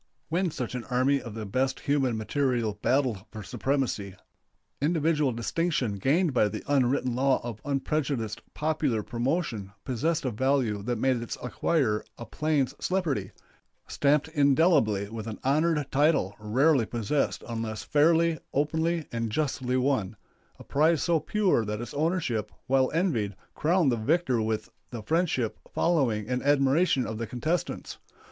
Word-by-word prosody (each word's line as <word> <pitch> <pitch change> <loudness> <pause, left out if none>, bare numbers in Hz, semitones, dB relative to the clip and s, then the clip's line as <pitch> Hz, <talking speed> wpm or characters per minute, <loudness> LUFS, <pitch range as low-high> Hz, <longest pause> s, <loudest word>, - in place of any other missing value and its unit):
When 175 +3 +1
such 125 -6 -5
an 125 -2 -4
army 135 +2 +2
of 115 -4 -8
the 110 -1 -5
best 130 +6 -1
human 135 -6 +1
material 115 -3 -1
battled 125 -7 +1
for 110 -2 -8
supremacy, 125 -9 -2 0.7
individual 150 -2 +2
distinction 125 -2 -1
gained 155 - +2
by 115 -4 +3
the 105 - -5
unwritten 130 -2 +2
law 130 +2 +2
of 115 -3 -6
unprejudiced 140 -5 -2
popular 150 -8 0
promotion 120 - -2
possessed 155 +6 -1
a 130 - 0
value 125 -3 +1
that 120 +3 -2
made 130 +2 +2
its 120 - -5
acquirer 125 -4 0 0.2
a 120 - -7
"plains 150 -2 0
celebrity," 155 - -1 0.6
stamped 145 +1 +2
indelibly 140 - +3
with 110 +1 -7
an 110 - -5
honored 150 +2 +2
title 145 - +2
rarely 125 +4 +2
possessed 120 +5 -1
unless 115 -2 -4
fairly, 165 +2 +3 0.2
openly, 160 +3 0
and 115 -2 -2
justly 130 -2 -1
won 125 -6 0 0.4
a - - -12
prize 155 +2 +2
so 170 -2 +2
pure 190 - +1
that 105 0 -3
its 120 -1 -6
ownership, 150 - -1
while 130 0 +3
envied, 130 - 0 0.2
crowned 165 -2 +2
the 120 - 0
victor 130 0 +1
with 110 0 -2 0.2
the 115 -3 -7
friendship, 155 -5 0
following, 125 -11 +1
and 125 +1 -1
admiration 140 0 +3
of 110 0 -5
the 115 - -3
contestants. 155 +9 -3
135 Hz, 145 wpm, -27 LUFS, 115-155 Hz, 0.7 s, by